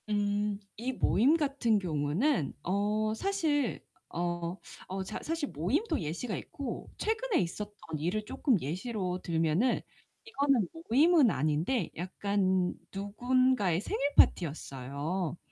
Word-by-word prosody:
음 205 Hz, 0 st, 0 dB, 0.2 s
이 250 Hz, +4 st, -2 dB
모임 260 Hz, +6 st, +4 dB
같은 275 Hz, -7 st, +2 dB
경우는 165 Hz, -, 0 dB
어 210 Hz, +3 st, +1 dB
사실 300 Hz, -, 0 dB, 0.3 s
어 175 Hz, +1 st, -2 dB, 0.3 s
어 190 Hz, +1 st, -3 dB
자 -, -, -5 dB
사실 325 Hz, -3 st, -2 dB
모임도 280 Hz, -, 0 dB
예시가 175 Hz, +8 st, -3 dB
있고, 270 Hz, -5 st, -6 dB
최근에 445 Hz, 0 st, 0 dB
있었던 205 Hz, +4 st, -4 dB, 0.2 s
일을 190 Hz, +7 st, -1 dB
쪼끔 235 Hz, -, +1 dB
예시로 180 Hz, -, -3 dB
들면은 165 Hz, +8 st, +2 dB, 0.5 s
이거는 275 Hz, -, +2 dB, 0.2 s
모임은 295 Hz, +2 st, +6 dB
아닌데 155 Hz, -, 0 dB
약간 185 Hz, 0 st, 0 dB, 0.2 s
누군가의 210 Hz, -1 st, +2 dB
생일 280 Hz, +6 st, -1 dB
파티였어요. 150 Hz, +2 st, +1 dB
205 Hz, 245 characters per minute, -31 LUFS, 175-260 Hz, 0.5 s, 모임은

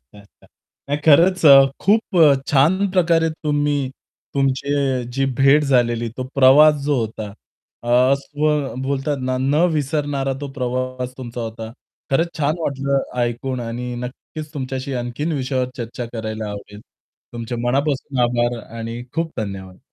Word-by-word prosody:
अच्छा, 70 Hz, +11 st, -18 dB
अच्छा. 100 Hz, -, -25 dB, 0.4 s
नाही 145 Hz, +1 st, 0 dB
खरंच 170 Hz, +4 st, +5 dB
अ, 135 Hz, -1 st, +8 dB
खूप 210 Hz, +3 st, +4 dB, 0.2 s
अ, 155 Hz, -4 st, +7 dB
छान 175 Hz, +8 st, +3 dB
प्रकारे 165 Hz, -3 st, +2 dB
तुम्ही 145 Hz, -3 st, -1 dB, 0.4 s
तुमची 135 Hz, -1 st, 0 dB
जी 135 Hz, +2 st, 0 dB
भेट 140 Hz, +2 st, +5 dB
झालेली 120 Hz, -3 st, +1 dB
तो 130 Hz, -, -3 dB
प्रवास 140 Hz, +3 st, +7 dB
जो 145 Hz, -1 st, +1 dB
होता 110 Hz, -1 st, -5 dB, 0.5 s
अ, -, -, -5 dB, 0.2 s
असं 145 Hz, -1 st, -1 dB
बोलतात 140 Hz, +2 st, -1 dB
ना, 130 Hz, 0 st, -1 dB
न 140 Hz, +5 st, +2 dB
विसरणारा 145 Hz, -2 st, -1 dB
तो 145 Hz, -, -5 dB
प्रवास 130 Hz, -1 st, -3 dB
तुमचा 120 Hz, -1 st, -6 dB
होता. 110 Hz, 0 st, -6 dB, 0.4 s
खरंच 165 Hz, +5 st, +2 dB
छान 150 Hz, 0 st, +1 dB
वाटलं 140 Hz, -2 st, 0 dB, 0.2 s
ऐकून 120 Hz, +2 st, -2 dB
आणि 120 Hz, +1 st, -5 dB
नक्कीच 150 Hz, +5 st, -8 dB
तुमच्याशी 135 Hz, 0 st, -4 dB
आणखीन 125 Hz, +6 st, -3 dB
विषयावर 130 Hz, -3 st, -1 dB
चर्चा 120 Hz, 0 st, -5 dB
करायला 110 Hz, -2 st, -4 dB
आवडेल. 105 Hz, 0 st, -9 dB, 0.5 s
तुमचे 120 Hz, 0 st, -5 dB
मनापासून 135 Hz, +1 st, -1 dB
आभार 120 Hz, 0 st, 0 dB, 0.2 s
आणि 115 Hz, +1 st, -5 dB
खूप 165 Hz, 0 st, -2 dB
धन्यवाद. 95 Hz, -3 st, -6 dB
135 Hz, 140 wpm, -20 LUFS, 120-145 Hz, 0.5 s, अ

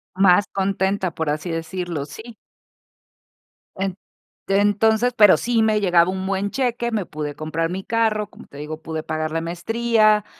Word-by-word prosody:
Más 190 Hz, +1 st, +5 dB
contenta, 190 Hz, -1 st, 0 dB
por 160 Hz, -2 st, -2 dB
así 155 Hz, +3 st, -3 dB
decirlo, 165 Hz, -2 st, -4 dB
sí. 220 Hz, +9 st, -11 dB, 1.4 s
En 190 Hz, -1 st, -2 dB, 0.5 s
entonces, 210 Hz, +4 st, +2 dB
pero 210 Hz, -4 st, +7 dB
sí 235 Hz, -2 st, +1 dB
me 215 Hz, -1 st, +2 dB
llegaba 175 Hz, -2 st, +4 dB
un 190 Hz, 0 st, -4 dB
buen 195 Hz, +1 st, -1 dB
cheque, 240 Hz, -2 st, -1 dB
me 210 Hz, -5 st, -1 dB
pude 150 Hz, -1 st, -5 dB
comprar 155 Hz, +2 st, -3 dB
mi 190 Hz, +2 st, -4 dB
carro, 220 Hz, -2 st, 0 dB
como -, -, -15 dB
te 140 Hz, -, -14 dB
digo, 155 Hz, +2 st, -7 dB
pude 160 Hz, 0 st, -4 dB
pagar 155 Hz, 0 st, -3 dB
la 165 Hz, -, -1 dB
maestría, 215 Hz, +5 st, +2 dB
190 Hz, 155 wpm, -22 LUFS, 165-215 Hz, 1.4 s, pero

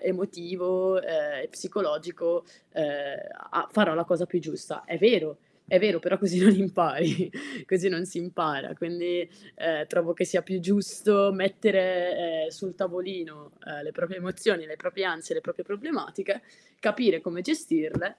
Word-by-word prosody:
emotivo, 185 Hz, 0 st, 0 dB
ehm 295 Hz, -1 st, -1 dB
e 480 Hz, -, -6 dB
psicologico, 170 Hz, -1 st, -2 dB, 0.3 s
ehm, 155 Hz, -, 0 dB, 0.7 s
a -, -, +2 dB
a -, -, -12 dB
farò 210 Hz, -8 st, +5 dB
la 170 Hz, -, +1 dB
cosa 180 Hz, 0 st, +1 dB
più 180 Hz, 0 st, 0 dB
giusta." 155 Hz, -2 st, -7 dB
È 170 Hz, -, -4 dB
vero 180 Hz, -7 st, +4 dB, 0.3 s
è 185 Hz, -, +6 dB
vero 200 Hz, -4 st, +3 dB
però 180 Hz, +3 st, +1 dB
così 185 Hz, -2 st, +1 dB
non 205 Hz, +2 st, +10 dB
impari 180 Hz, -2 st, +2 dB, 0.4 s
così 190 Hz, +1 st, +3 dB
non 180 Hz, -1 st, -1 dB
si 185 Hz, -1 st, -7 dB
impara, 170 Hz, -5 st, -2 dB
quindi, 175 Hz, 0 st, -2 dB, 0.3 s
uhm, 160 Hz, -2 st, -1 dB
trovo 175 Hz, 0 st, +1 dB
che 180 Hz, +2 st, 0 dB
sia 180 Hz, -1 st, +1 dB
più 185 Hz, +1 st, -3 dB
giusto 200 Hz, +1 st, +4 dB
mettere, 185 Hz, -4 st, +2 dB
ehm, -, -, -3 dB
sul 175 Hz, +3 st, -7 dB
tavolino, 180 Hz, -5 st, -5 dB
uhm, 145 Hz, -1 st, -8 dB
le -, -, -6 dB
proprie 185 Hz, +2 st, -4 dB
emozioni, 185 Hz, -1 st, 0 dB
le 155 Hz, -, -9 dB
proprie 180 Hz, +3 st, -3 dB
ansie, 165 Hz, -, -3 dB
le -, -, 0 dB
proprie -, -, -6 dB
problematiche, 205 Hz, -4 st, -4 dB, 0.4 s
capire 210 Hz, -5 st, +3 dB
come 180 Hz, -1 st, -5 dB
gestirle, 320 Hz, -, -1 dB
180 Hz, 160 wpm, -27 LUFS, 170-195 Hz, 0.7 s, non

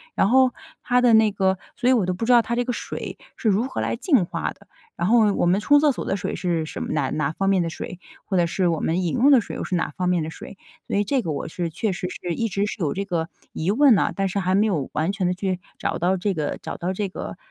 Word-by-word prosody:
然 195 Hz, -, +3 dB
后 260 Hz, 0 st, +5 dB, 0.3 s
它 250 Hz, 0 st, +3 dB
的 245 Hz, -2 st, +5 dB
那 220 Hz, -1 st, +5 dB
个 190 Hz, -1 st, +1 dB, 0.2 s
所 245 Hz, -, -1 dB
以 260 Hz, -, +6 dB
我 220 Hz, -7 st, +2 dB
都 185 Hz, -, -1 dB
不 190 Hz, +6 st, -3 dB
知 250 Hz, -, +2 dB
道 240 Hz, -, +7 dB
它 235 Hz, +1 st, -3 dB
这 245 Hz, -, +1 dB
个 250 Hz, -, -1 dB
水 -, -, -6 dB, 0.2 s
是 225 Hz, -, +1 dB
如 210 Hz, +5 st, +2 dB
何 -, -, -4 dB
来 -, -, -1 dB
净 250 Hz, -, +2 dB
化 -, -, -3 dB
的。 -, -, -17 dB, 0.3 s
然 175 Hz, -, -1 dB
后 225 Hz, 0 st, +5 dB
用 205 Hz, -, +1 dB
我 -, -, +2 dB
们 180 Hz, +3 st, +3 dB
冲 290 Hz, +6 st, +5 dB
厕 300 Hz, 0 st, +4 dB
所 255 Hz, -, -5 dB
的 195 Hz, -, -1 dB
水 180 Hz, -, -3 dB
是 170 Hz, -3 st, -1 dB
什 -, -, -7 dB
么 -, -, -4 dB
哪 140 Hz, -4 st, 0 dB
哪 150 Hz, -1 st, -1 dB
方 195 Hz, +4 st, -1 dB
面 195 Hz, -2 st, +3 dB
的 165 Hz, -, -2 dB
水？ 175 Hz, +1 st, -7 dB, 0.3 s
或 195 Hz, -, -2 dB
者 170 Hz, -, +3 dB
是 180 Hz, +2 st, 0 dB
我 165 Hz, -2 st, 0 dB
们 175 Hz, +3 st, 0 dB
饮 170 Hz, -, -1 dB
用 255 Hz, +4 st, +4 dB
的 260 Hz, -, +6 dB
水 -, -, -7 dB
又 -, -, -4 dB
是 185 Hz, -, -2 dB
哪 170 Hz, -, -1 dB
方 180 Hz, -1 st, 0 dB
面 175 Hz, -3 st, +1 dB
的 155 Hz, -, -4 dB
水？ 195 Hz, -, -11 dB, 0.3 s
所 -, -, -1 dB
以 205 Hz, -, +3 dB
这 255 Hz, +6 st, 0 dB
个 165 Hz, -8 st, -3 dB
我 145 Hz, -, -4 dB
是 170 Hz, +1 st, -3 dB
确 195 Hz, +6 st, -2 dB
实 180 Hz, 0 st, -3 dB
是 175 Hz, -1 st, -4 dB
一 230 Hz, -, 0 dB
直 200 Hz, 0 st, -1 dB
是 210 Hz, -, -5 dB
有 155 Hz, -6 st, 0 dB
这 200 Hz, +1 st, -2 dB
个 170 Hz, -4 st, -2 dB, 0.2 s
疑 160 Hz, -, -2 dB
问 270 Hz, +2 st, +6 dB
呐， -, -, +1 dB
但 195 Hz, -1 st, 0 dB
是 200 Hz, -, -1 dB
还 185 Hz, 0 st, +1 dB
没 205 Hz, +2 st, +4 dB
有 155 Hz, -10 st, -1 dB
完 160 Hz, +5 st, 0 dB
全 195 Hz, -3 st, -1 dB
地 180 Hz, -, 0 dB
去 185 Hz, -1 st, -2 dB, 0.2 s
找 -, -, -2 dB
到 180 Hz, +3 st, +2 dB
这 195 Hz, +2 st, -1 dB
个 150 Hz, -4 st, -2 dB
找 -, -, -6 dB
到 180 Hz, +2 st, -2 dB
这 200 Hz, 0 st, -2 dB
个， -, -, -7 dB
190 Hz, 320 characters per minute, -23 LUFS, 175-225 Hz, 0.3 s, 道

